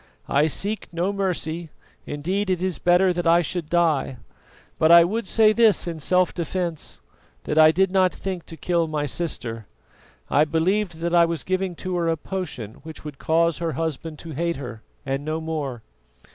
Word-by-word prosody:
I 145 +3 +3
seek 205 +7 -2
no 175 +4 -1
mercy; 175 -4 -2 0.4
indeed, 185 +8 -2
it 185 -1 0
is 185 -2 -1
better 180 +1 +4
that 175 -1 -2
I 170 +1 +5
should 170 -1 -4
die; 160 -7 +1 0.6
but 160 - +4
I 170 0 +9
would 210 +4 -2
say 215 +1 +4
this 225 -2 +4
in 165 -2 -4
self 180 +4 +2
defence, 170 -1 -4 0.4
that 155 - 0
I 155 0 +9
did 190 +3 +2
not 185 -1 +3
think 185 -3 -6
to 165 - -10
kill 170 +1 0
my 150 -2 -2
sister. 120 -8 -4 0.6
I 145 - +4
believed 165 +3 0
that 170 0 -1
I 170 -1 +6
was 165 -3 -3
giving 185 -1 -1
to 185 -1 -1
her 170 -1 0
a 165 0 +1
potion 145 - -6
which 160 -1 -11
would 145 -3 -8
cause 165 0 +1
her 165 -2 -2
husband 160 +1 -4
to 165 - -6
hate 170 +3 -1
her 125 -5 -8 0.2
and 135 +1 -2
no 155 +1 -2
more." 150 -7 -4
170 Hz, 185 wpm, -23 LUFS, 155-185 Hz, 0.6 s, I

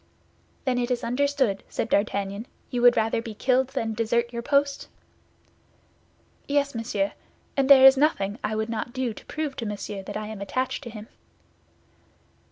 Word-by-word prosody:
"Then 255 -2 +1
it 240 0 -1
is 250 -1 -1
understood," 260 -4 0
said - - -2
D'Artagnan; 200 +1 -1 0.2
"you 245 - -1
would 245 0 +6
rather 225 +1 +1
be 225 -2 -8
killed 260 +3 +2
than 240 -5 -3
desert 235 +2 0
your 235 - -3
post?" 280 +2 +1 1.6
"Yes, 280 0 +1
monsieur; 225 -4 -1 0.4
and 275 -1 +1
there 265 -1 +9
is 270 0 +9
nothing 235 -8 +1
I 215 +1 -1
would 220 0 -1
not 230 +1 -4
do 255 -3 -2
to - - -13
prove 300 -3 -3
to 230 - -4
Monsieur 205 -1 -5
that 190 - -6
I 215 - -4
am 215 -1 -7
attached 255 +6 -2
to - - -6
him." 215 -1 -9
235 Hz, 170 wpm, -25 LUFS, 215-265 Hz, 1.6 s, there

